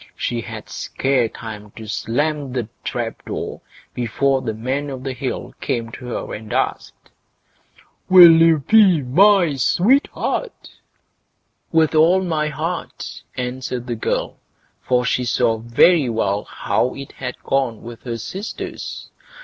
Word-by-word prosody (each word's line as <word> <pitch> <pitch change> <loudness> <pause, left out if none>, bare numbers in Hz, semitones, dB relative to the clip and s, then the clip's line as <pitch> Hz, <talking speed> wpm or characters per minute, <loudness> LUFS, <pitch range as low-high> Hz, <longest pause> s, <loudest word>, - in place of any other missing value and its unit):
She 120 -1 -2
had - - -8
scarce 130 -4 0
time 105 -2 -8
to 110 - -9
slam 140 +6 -2
to 125 -2 -1
the 110 - -14
trap 120 -2 -4
door - - -5 0.3
before 130 +3 0
the 110 -4 -3
Man 130 +6 -2
o' 135 - -5
the 130 +1 -5
Hill 130 +1 -5
came 115 -2 -2
to 125 +1 -9
her 125 - -4
and 105 0 -8
asked: - - -3 1.0
"Will 180 -2 +10
you 165 -2 +5
be 195 -9 +5
my 180 +4 +4
sweetheart?" 255 - 0 1.0
"With 160 -1 +3
all 170 +4 +4
my 160 -4 0
heart", 165 +3 -5 0.2
answered 125 0 -4
the 120 - -3
girl, 115 - -2 0.4
for 125 -1 +1
she 125 - +1
saw 120 -2 +1
very 125 +6 +4
well 105 -3 -1
how 125 - -1
it 140 0 -8
had 125 -1 -6
gone 130 -5 -1
with 115 0 -9
her 120 -2 -4
sisters. 190 - -6
130 Hz, 140 wpm, -20 LUFS, 120-160 Hz, 1.0 s, Will